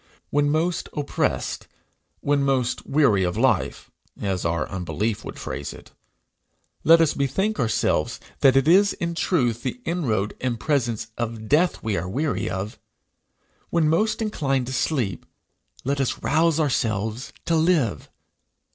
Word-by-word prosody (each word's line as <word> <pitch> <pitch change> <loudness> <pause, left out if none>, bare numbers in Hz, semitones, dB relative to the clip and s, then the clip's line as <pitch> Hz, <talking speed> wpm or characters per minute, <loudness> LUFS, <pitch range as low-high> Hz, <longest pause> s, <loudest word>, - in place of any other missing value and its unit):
When 145 0 +2
most 165 +3 0
oppressed, 145 -1 -1 0.5
when 145 0 +2
most 135 -3 0
weary 135 -10 +3
of 90 +2 -1
life, 115 -6 +1 0.3
as 95 -3 -2
our 85 -2 0
unbelief 100 +4 -2
would - - -8
phrase 70 +2 -5
it, - - -14 0.9
let 165 +1 +7
us 160 - +3
bethink 175 - 0
ourselves 110 - +1 0.2
that 135 -2 +5
it 135 +2 +3
is 195 +4 +5
in 170 -2 -3
truth 125 - +1
the 245 - -4
inroad 115 - 0
and 125 -3 -1
presence 120 -7 0
of 115 -2 -4
death 160 +6 +2
we 110 -3 0
are 85 +2 -3
weary 140 +5 -1
of. 95 +3 -4 0.9
When 165 -2 +2
most 215 +8 +1
inclined 135 - 0
to 130 - -5
sleep, 120 - -1 0.6
let 140 +1 0
us 135 - -2
rouse 165 0 +3
ourselves 115 -3 -1
to 165 - +2
live. 160 - +1
135 Hz, 140 wpm, -24 LUFS, 110-160 Hz, 0.9 s, let